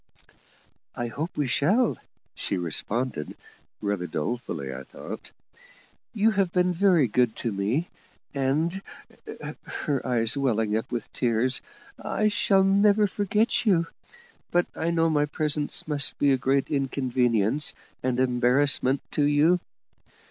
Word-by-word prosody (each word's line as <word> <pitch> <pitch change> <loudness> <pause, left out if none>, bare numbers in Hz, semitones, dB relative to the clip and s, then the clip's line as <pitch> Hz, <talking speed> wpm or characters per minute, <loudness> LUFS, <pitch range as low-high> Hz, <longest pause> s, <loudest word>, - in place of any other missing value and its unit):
"I 120 -1 -3
hope 155 +8 -5
we 145 - +1
shall," 195 - +2 0.3
she 95 - -3
responded; 100 - -2 0.4
rather 100 -4 -2
dolefully, 75 - -4
I 65 - -7
thought. - - -9 0.8
"You 220 +1 +2
have 195 -4 +1
been 180 0 +2
very 175 -6 +3
good 120 0 +1
to 115 - -3
me, 105 - -1 0.5
and," 150 +7 0 1.0
her 140 -4 -1
eyes 120 -1 +1
welling 115 -6 0
up 110 - -3
with 120 -2 -5
tears 125 +1 +1 0.4
"I 215 0 +1
shall 195 -2 +3
never 200 +2 +4
forget 205 +3 0
you; 170 -5 +4 0.6
but 175 0 +2
I 165 - -1
know 165 -1 +2
my 150 -2 +1
presence 150 0 -1
must 145 -2 +2
be 140 - +3
a - - +5
great 135 +2 0
inconvenience 130 -2 +1 0.3
and 125 -1 -1
embarrassment 130 +2 +3
to 145 - +1
you." 150 +5 +4
140 Hz, 125 wpm, -26 LUFS, 120-170 Hz, 1.0 s, a